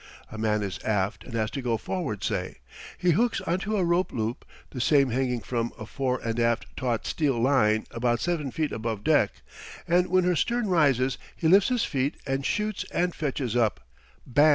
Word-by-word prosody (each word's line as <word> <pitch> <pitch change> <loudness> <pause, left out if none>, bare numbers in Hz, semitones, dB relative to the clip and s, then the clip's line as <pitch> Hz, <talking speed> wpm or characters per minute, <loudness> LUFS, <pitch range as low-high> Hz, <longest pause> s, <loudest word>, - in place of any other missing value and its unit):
A 110 - -7
man 105 -1 +1
is 95 -3 -4
aft 105 0 -1
and 120 - -8
has 110 -1 0
to 140 - -4
go 120 -2 0
forward, 110 - -4
say. - - -2 0.4
He 180 -1 +2
hooks 235 +8 +2
onto 195 +5 -1
a 185 - +2
rope 170 +2 +1
loop, 115 +2 -3 0.3
the 125 - -4
same 140 -1 +4
hanging 125 -1 0
from 120 -1 -2
a 110 - -7
fore 130 +2 -1
and 115 0 -1
aft 115 0 +1
taut 120 -3 -1
steel 140 -7 0
line 115 -4 +3
about 120 0 0
seven 165 -4 -1
feet 150 +4 -2
above 110 -2 -3
deck, - - +4 0.6
and 180 +1 +3
when 185 0 +3
her 180 0 +2
stern 235 +4 0
rises 135 -7 +2 0.2
he 165 - 0
lifts 195 +6 +6
his 250 -3 +1
feet 135 0 -1
and 135 0 -1
shoots 210 -1 -1
and 175 0 0
fetches 135 -5 -2
up 115 -3 +2 0.5
Bam! 145 +5 +5
130 Hz, 195 wpm, -27 LUFS, 115-170 Hz, 0.6 s, lifts